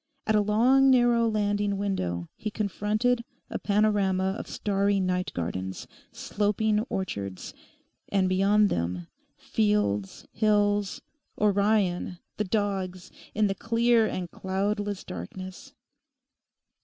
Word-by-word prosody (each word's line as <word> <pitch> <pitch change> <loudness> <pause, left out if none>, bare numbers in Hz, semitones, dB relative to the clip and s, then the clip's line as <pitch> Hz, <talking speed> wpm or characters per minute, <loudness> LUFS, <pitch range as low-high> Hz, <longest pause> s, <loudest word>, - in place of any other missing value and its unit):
At 220 - +2
a 210 - +4
long, 245 +6 +4
narrow 240 -2 +4
landing 205 -1 0
window 90 - -2
he 215 - -4
confronted 215 +4 0 0.3
a - - -3
panorama 200 -2 +1
of - - -7
starry 200 0 +1
night 185 -1 -1
gardens, 95 +2 -4 0.3
sloping 210 +1 0
orchards; 100 - -4 0.6
and 195 -2 +2
beyond 200 +3 +3
them 85 +1 -2 0.3
fields, 105 -2 0
hills, 205 -2 +1 0.4
Orion, 200 -3 +1 0.2
the 210 - +1
Dogs, 190 -3 -2 0.2
in 215 0 +3
the 195 - +1
clear 230 +1 +2
and 180 -4 -4
cloudless 205 +1 -2
darkness. 185 - -8
200 Hz, 105 wpm, -27 LUFS, 185-210 Hz, 0.6 s, a